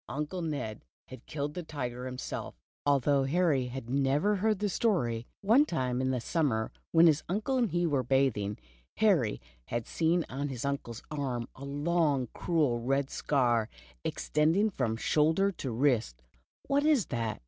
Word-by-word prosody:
Uncle 150 +5 -3
Ned 140 -10 -3 0.3
had 130 -1 -11
killed 145 0 -3
the 180 - -4
tiger 125 -6 -5
himself, 125 - -5 0.3
although 140 0 +3
Harry 145 -4 +2
had 125 -1 -6
never 140 +10 +2
heard 215 +2 +1
the 205 +2 -1
story. 120 - 0
One 225 +8 +5
time 130 - -1
in 130 - 0
the 130 -1 0
summer, 120 -6 0 0.2
when 165 0 +6
his 155 -2 +5
uncle 215 +8 0
and 235 -4 +2
he 175 0 0
were 145 -5 +1
bathing, 125 -6 +1 0.4
Harry 175 - +3 0.3
had 120 - -3
seen 170 +1 +1
on 140 +2 -3
his 130 -1 -4
uncle's 135 -5 -4
arm 130 -5 -2
a 135 - -9
long, 145 -3 +1
cruel 150 -9 +1
red 135 +3 0
scar, 120 -6 +1 0.3
extending 165 +8 +1
from 120 - -1
shoulder 160 +10 +2
to 145 -7 -5
wrist. 115 - 0 0.4
"What 280 +1 +1
is 295 - +3
that?" 115 -3 -2
140 Hz, 160 wpm, -30 LUFS, 125-170 Hz, 0.4 s, when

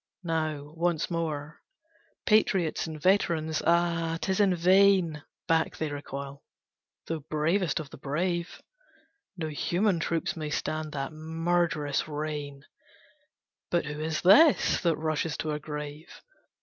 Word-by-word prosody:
Now, 155 -3 -2
once 170 0 0
more, 155 -3 -3 0.6
Patriots 190 -7 +2
and 155 -1 -7
veterans! 160 -3 +1
Ah! 170 -1 +2
'Tis 190 +2 -1
in 195 -3 +4
vain! 185 -3 +4 0.3
Back 165 -1 +1
they 155 -2 -2
recoil, 140 -1 -7 0.6
though 165 -1 -3
bravest 165 +4 +1
of 150 -3 -8
the - - -11
brave; 170 +5 -2 0.7
No 160 -2 -3
human 175 +5 0
troops 165 0 -1
may 155 -2 -4
stand 155 0 -3
that 135 0 -4
murderous 160 -2 -1
rain; 145 -2 -5 1.0
But 175 -2 +1
who 150 0 -5
is 155 0 -2
this 285 - +6
that 170 -3 +1
rushes 155 0 -1
to 155 - -2
a 150 - -2
grave? 150 +1 -7
160 Hz, 125 wpm, -28 LUFS, 150-175 Hz, 1.0 s, this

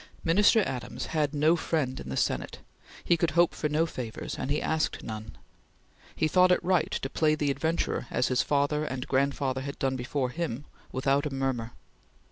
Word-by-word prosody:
Minister 205 +6 +5
Adams 125 -7 -4
had 150 -3 +1
no 155 +3 +4
friend 155 -6 -1
in 65 - -8
the 65 - -3
Senate; - - -1 0.5
he 170 - +3
could 170 0 +1
hope 175 0 +5
for 150 - -2
no 155 +2 +2
favors, 125 -8 -5
and - - -3
he 145 - +1
asked 160 0 -1
none. 110 0 -7 0.8
He 155 - +1
thought 180 +4 +5
it 180 - +3
right 180 -2 +2
to - - -2
play 155 +2 +2
the 145 -2 0
adventurer 160 -2 -1
as 125 - +1
his 125 - +2
father 145 +1 +1
and 130 -4 -4
grandfather 135 -1 0
had 140 +1 -6
done 135 -1 0
before 125 +1 -2
him, 150 -4 -3 0.3
without 140 +3 +1
a - - -6
murmur. 130 -4 -2
145 Hz, 185 wpm, -28 LUFS, 130-160 Hz, 0.8 s, Minister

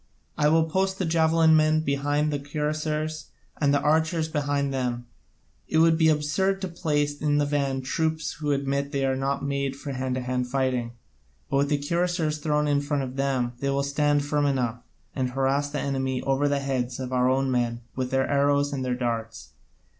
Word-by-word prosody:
I 150 - +2
will 160 +1 +4
post 190 +4 0
the 190 - -1
javelin 160 0 +4
men 155 0 +3
behind 145 +1 0
the 145 - -1
cuirassiers, 150 +1 -2 0.3
and 145 -2 +2
the 145 - +3
archers 160 +2 +2
behind 145 -2 -1
them: 125 -2 -2 0.6
it 160 - 0
would 165 0 +5
be 160 -1 +4
absurd 155 +6 +1
to 190 - -2
place 145 -4 -1
in 145 -1 +2
the 145 - +2
van 140 -2 -1
troops 160 +3 -1
who 150 -1 -2
admit 140 0 0
that 140 - -15
they 135 -1 +1
are 135 0 +1
not 135 +1 -2
made 140 -1 -1
for 140 +1 -6
hand 130 -1 -2
to 130 - -2
hand 125 0 -2
fighting; 125 -2 -1 0.6
but 135 - +2
with 140 +1 +2
the 145 - +2
cuirassiers 165 +1 -1
thrown 150 0 +1
in 145 -1 +2
front 145 -1 -1
of 130 0 -6
them 135 -3 0
they 140 - -1
will 140 0 +1
stand 145 +1 +1
firm 145 0 +1
enough, 125 -4 -1 0.3
and 130 -2 0
harass 135 +2 0
the 145 0 -3
enemy 130 -2 -1
over 135 +1 +1
the 140 -1 0
heads 130 -2 -2
of 130 -1 -4
our 125 0 +3
own 135 0 +1
men 120 -1 0
with 130 -1 -2
their 135 0 +1
arrows 145 0 +2
and 135 -2 -2
their 125 -1 -1
darts. 115 -3 -4
140 Hz, 200 wpm, -26 LUFS, 130-150 Hz, 0.6 s, would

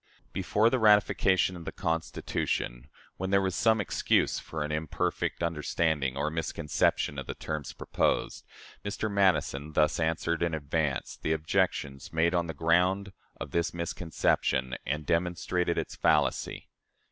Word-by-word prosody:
Before 110 +3 +2
the 130 - +2
ratification 105 -4 +4
of 85 - -8
the - - -5
Constitution 80 -6 -2 0.3
when 95 +1 -3
there 100 0 +4
was 95 -1 0
some 110 +4 +3
excuse 100 - +1
for 80 -2 -5
an 75 - -4
imperfect 80 +2 -2
understanding 75 -4 0
or 75 +2 0
misconception 80 -3 0
of 70 - -7
the - - -4
terms 75 -3 -4
proposed - - -1 0.4
Mr. 105 +1 -3
Madison 80 -7 +1
thus 75 +1 +2
answered, 80 +1 0
in 85 -2 +1
advance, 75 -1 -2
the 80 - +1
objections 70 -3 -1
made 80 +2 +2
on 85 -1 +1
the 80 - -5
ground 90 +5 +2 0.3
of - - -6
this 85 0 0
misconception, 80 -6 0
and 75 +2 -2
demonstrated 85 +1 0
its - - -3
fallacy. - - +1
80 Hz, 140 wpm, -29 LUFS, 75-90 Hz, 0.4 s, ratification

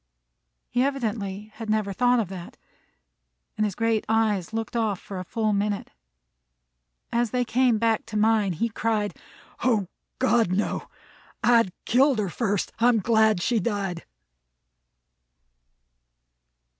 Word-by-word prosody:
He 245 - +2
evidently 215 -6 -2
had 225 -1 -6
never 215 -2 0
thought 245 +4 +3
of 220 - -1
that, 180 -3 -9 1.0
and 215 - +1
his 195 - -5
great 225 -1 +1
eyes 215 -5 +1
looked 225 +1 -4
off 215 -5 0
for 195 -2 -7
a - - -4
full 215 +3 -1
minute. 205 0 -1 1.2
As 235 0 +1
they 250 +2 0
came 240 0 +2
back 225 0 +1
to 220 -1 -3
mine, 215 -3 +3
he 200 +9 0
cried: 215 -2 -1 0.5
"O 220 -7 +2 0.3
God, 240 -7 +2
no! 195 +3 -1 0.5
I'd 230 -5 +4
killed 265 +2 +4
her 205 -3 -1
first. 205 0 -1
I'm 240 0 +4
glad 220 -3 +3
she 235 -2 +2
died." 200 -6 -2
220 Hz, 130 wpm, -25 LUFS, 205-235 Hz, 1.2 s, I'd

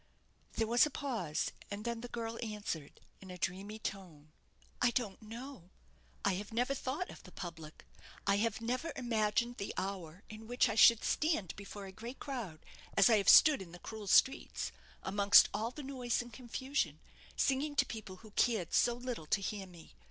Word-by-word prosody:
There 225 - +1
was 240 +5 +5
a - - -5
pause, 230 - -2 0.2
and 205 +2 -6
then 235 -1 -2
the 245 - -6
girl 230 -1 -5
answered, 205 -9 -5 0.2
in 190 - -11
a 180 - -7
dreamy 195 +5 -3
tone 175 -8 -7 0.5
"I 245 - +5
don't 235 -5 -2
know. 225 -3 -9 0.6
I 200 - +3
have 210 - -11
never 245 +4 +1
thought 275 +7 -3
of - - -12
the - - -14
public. 160 -3 -8 0.4
I 200 0 +3
have 225 +2 0
never 255 +8 -2
imagined 235 0 0
the 200 - -4
hour 185 -1 -4
in 215 +1 -10
which 245 +2 +3
I - - 0
should 225 +1 +7
stand 300 - 0
before 200 0 -8
a 190 - -8
great 235 +6 -8
crowd, 230 - -6 0.3
as 195 +4 +7
I 220 - +6
have 200 -2 +3
stood 300 -8 +8
in 175 -3 -10
the - - -8
cruel 215 +2 -8
streets, 265 +7 +3 0.3
amongst 200 +1 +6
all 215 +3 -1
the 290 +4 -9
noise 255 -3 -1
and 240 -1 -13
confusion, 260 +4 -2 0.4
singing 285 +2 +1
to 280 - +4
people 215 -6 -7
who 215 - -13
cared 210 -6 +1
so 240 -1 +4
little 245 -9 -5
to 200 - +2
hear 195 0 -4
me. 170 - -15
220 Hz, 185 wpm, -34 LUFS, 195-245 Hz, 0.6 s, stood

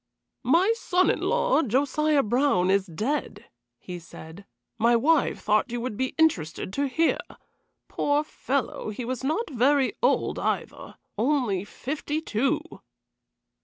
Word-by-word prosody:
"My 340 - +3
son 370 -5 +2
in - - -2
law, - - +2
Josiah 285 +3 +1
Brown, 215 -6 +2
is 195 0 +2
dead," 215 - -3 0.3
he 180 -1 -8
said. 170 +3 -12 0.3
"My 235 +2 +4
wife 300 +6 +2
thought 215 +1 +1
you 240 - -2
would 235 -2 -4
be 260 +4 -2
interested 190 - +1
to 280 0 0
hear. 320 +5 +1 0.7
Poor 290 +1 0
fellow, 275 -6 -3
he 225 +3 -5
was 255 +1 -4
not 315 - -1
very 265 +2 +2
old - - +1
either - - -3 0.2
only 235 -7 +1
fifty 290 +7 -4
two." 275 +2 0
260 Hz, 130 wpm, -26 LUFS, 215-300 Hz, 0.7 s, My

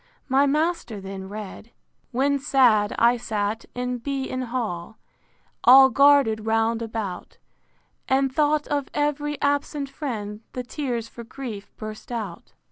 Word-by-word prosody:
My 275 +1 +3
master 300 -7 0
then 190 0 -7
read: 210 +1 -8
I. - - -31 0.4
When 280 +3 +1
sad 240 -7 +3
I 235 +1 +4
sat 215 -1 -2
in 250 0 -2
B——n 265 0 -3
hall, 225 -6 -4 0.7
All 265 +1 +8
guarded 275 -7 +5
round 225 +1 +1
about, 220 -5 -5 0.7
And 265 0 +2
thought 300 +1 +2
of 285 -2 -1
ev'ry 295 0 -1
absent 285 0 0
friend, 215 -8 -5
The 250 - -4
tears 245 -3 -3
for 235 - -10
grief 230 -4 -8
burst 215 +2 -8
out. 230 -3 -6
245 Hz, 130 wpm, -24 LUFS, 220-280 Hz, 0.7 s, All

